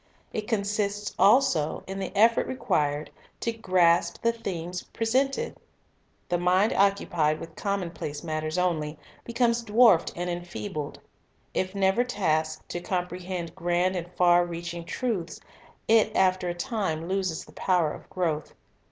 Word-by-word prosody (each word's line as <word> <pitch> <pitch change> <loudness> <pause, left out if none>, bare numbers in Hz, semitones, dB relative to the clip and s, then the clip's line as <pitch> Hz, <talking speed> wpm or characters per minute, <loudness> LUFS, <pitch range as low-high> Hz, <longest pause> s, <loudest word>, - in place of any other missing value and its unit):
It 215 -1 -3
consists 205 -1 -1
also 195 - +4
in 195 +1 -5
the 190 - -3
effort 230 +2 +4
required 150 - -1 0.3
to 230 - 0
grasp 175 -6 +2
the 230 - +4
themes 180 -6 -5
presented. 270 - -1 0.7
The 175 -1 0
mind 185 +5 +3
occupied 175 -6 +2
with 165 -1 -9
common 200 -4 -2
place 150 -3 -6
matters 155 0 -2
only, 160 -4 0 0.3
becomes 235 0 +1
dwarfed 225 -4 +5
and 175 +1 -3
enfeebled. 175 -2 -5 0.5
If 185 +1 -1
never 195 +4 +3
tasked 160 -9 -1
to 175 - -3
comprehend 180 -1 -3
grand 175 +2 0
and 175 0 -4
far 175 -1 +5
reaching 170 0 -5
truths, 185 -8 -3 0.5
it 220 -1 +5
after 185 -1 +2
a 175 - -3
time 175 -6 -2
loses 185 -3 -1
the - - -16
power 175 -5 +1
of - - -10
growth. 160 -5 -2
180 Hz, 135 wpm, -27 LUFS, 170-205 Hz, 0.7 s, dwarfed